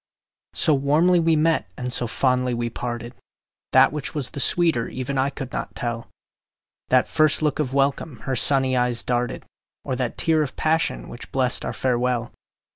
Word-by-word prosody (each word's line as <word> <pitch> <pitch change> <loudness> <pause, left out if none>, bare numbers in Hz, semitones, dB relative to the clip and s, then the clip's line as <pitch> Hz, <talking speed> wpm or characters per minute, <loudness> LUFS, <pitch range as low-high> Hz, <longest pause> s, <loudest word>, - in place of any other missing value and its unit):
So 155 - +3
warmly 150 +6 +3
we 165 -1 +2
met 155 - +1
and 125 0 -3
so 120 - +2
fondly 125 +1 +1
we 120 0 -3
parted, 120 0 -5 0.6
That 130 +2 +5
which 150 0 -4
was 140 -4 -1
the - - -7
sweeter 160 -3 +3
even 130 +1 -4
I 135 +1 +1
could 135 -2 -8
not - - -5
tell, 120 -1 -4 0.8
That - - +3
first 155 0 +2
look 150 -1 0
of 140 -4 -1
welcome 140 -2 -1
her 130 - -3
sunny 130 -1 +3
eyes 125 -1 0
darted, 125 0 -2 0.4
Or 130 - -2
that 125 -2 -3
tear 160 -1 +2
of 145 - -3
passion, 160 +1 0
which 120 - -10
blest 130 -2 +1
our - - -3
farewell. 125 -2 -1
130 Hz, 175 wpm, -23 LUFS, 125-150 Hz, 0.8 s, That